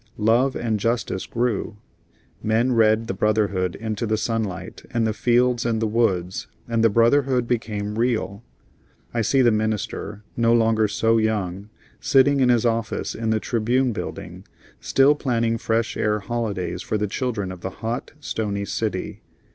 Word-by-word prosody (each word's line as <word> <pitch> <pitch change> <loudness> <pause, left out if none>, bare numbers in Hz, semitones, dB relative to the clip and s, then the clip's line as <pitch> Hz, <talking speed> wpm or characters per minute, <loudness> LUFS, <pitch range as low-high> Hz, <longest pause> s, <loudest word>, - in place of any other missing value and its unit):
Love 120 +5 +2
and 110 -3 -1
justice 115 -3 -1
grew; 120 -4 -2 0.6
men 115 +4 +1
read 110 -1 +3
the 105 - -3
brotherhood 100 -3 0
into 110 +1 -3
the 110 0 +1
sunlight 110 -4 -3
and 115 -1 0
the 110 - 0
fields 120 +1 +2
and 115 -2 0
the 110 - 0
woods, 100 -5 0 0.2
and 115 -1 +1
the 115 - +6
brotherhood 125 +3 +3
became 105 -3 -2
real. 115 -3 -1 0.7
I 120 - 0
see 130 +5 +3
the 120 - +5
minister, 110 -1 -2
no 115 0 +3
longer 110 -1 +3
so 115 +2 +2
young, 100 -2 -2 0.3
sitting 140 +1 +4
in 130 -2 +4
his 120 -1 +3
office 115 -1 -1
in 110 0 -3
the 110 0 +2
"Tribune" 120 +3 0
building, - - -7 0.4
still 135 +2 +4
planning 115 -5 0
Fresh 115 0 0
Air 105 0 0
holidays 100 -6 -3
for 110 - -2
the 105 - 0
children 105 -2 -2
of 90 -2 -9
the 95 - -3
hot, 115 +5 -5
stony 105 -7 -3
city. - - -3
115 Hz, 155 wpm, -23 LUFS, 105-120 Hz, 0.7 s, the